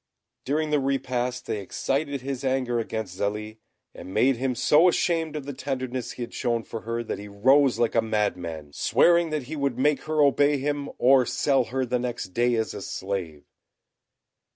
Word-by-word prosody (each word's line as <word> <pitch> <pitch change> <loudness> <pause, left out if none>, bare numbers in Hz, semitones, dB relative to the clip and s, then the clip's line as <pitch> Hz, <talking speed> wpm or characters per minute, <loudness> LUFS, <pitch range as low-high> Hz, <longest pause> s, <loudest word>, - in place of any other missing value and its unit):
During 150 +3 0
the 150 - +3
repast 125 -2 -1
they 105 - -2
excited 140 +7 -2
his 135 0 -4
anger 130 -2 0
against 110 -5 -4
Zélie, 105 +2 -3 0.3
and 95 - -10
made 125 +7 +3
him 130 0 -1
so 150 +8 +5
ashamed 165 -3 +1
of 150 -3 -5
the 140 - -5
tenderness 130 -2 -4
he 125 - -5
had 120 - -8
shown 120 -2 -1
for 115 0 -7
her, 115 +1 -3
that 110 - -4
he 105 - -8
rose 130 +6 +3
like 120 -1 +1
a 115 - +3
madman, 90 -9 -2
swearing 170 - +3
that 155 -3 -2
he 150 +6 -6
would 140 -4 -1
make 145 +2 +1
her 155 0 -1
obey 145 +1 +4
him, 145 +1 -2
or 130 +1 +5
sell 135 -3 +2
her 130 +3 -2
the 125 0 -1
next 120 -6 -4
day 120 +5 +1
as 110 -1 -1
a 100 - -7
slave. 95 -7 -5
125 Hz, 185 wpm, -25 LUFS, 110-140 Hz, 0.3 s, so